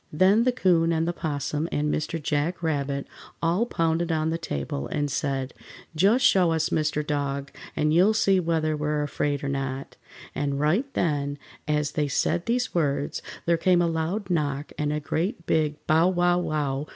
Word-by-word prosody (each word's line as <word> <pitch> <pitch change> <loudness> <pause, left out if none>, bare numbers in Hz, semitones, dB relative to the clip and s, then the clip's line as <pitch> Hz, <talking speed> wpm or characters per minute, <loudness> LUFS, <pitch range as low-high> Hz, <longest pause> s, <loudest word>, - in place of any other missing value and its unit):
Then 195 +9 +4
the 255 - +4
'Coon 175 -8 +2
and 165 0 +1
the 175 - 0
'Possum 150 0 -2
and 150 0 0
Mr. 160 +2 -2
Jack 150 +4 -1
Rabbit 140 -3 -1 0.3
all 175 +8 +1
pounded 165 -3 0
on 160 0 0
the 165 - -1
table, 70 - -4
and 145 -1 -2
said, 135 -1 -2 0.4
"Just 210 +10 +4
show 180 -8 +4
us 160 0 0
Mr. 150 -1 0
Dog, 140 -2 -2 0.2
and 150 0 +1
you'll 190 +6 +4
see 195 -3 +3
whether 160 -2 0
we're 150 0 -1
afraid 145 -1 -2
or - - -2
not," 135 -1 -4 0.4
and 140 -1 -2
right 185 - +1
then, 145 -3 0 0.3
as 150 -1 0
they 150 -1 0
said 170 +6 0
these 245 +2 0
words, 145 -4 0 0.2
there 170 0 +3
came 180 +1 +3
a 175 - +3
loud 170 +5 -2
knock, 145 -3 -1
and 150 0 -1
a 150 - -1
great 165 +4 -2
big 155 -2 +1
bow! 160 +3 +4
wow! 175 -1 +2
wow! 150 -4 -2
155 Hz, 175 wpm, -25 LUFS, 145-175 Hz, 0.4 s, Then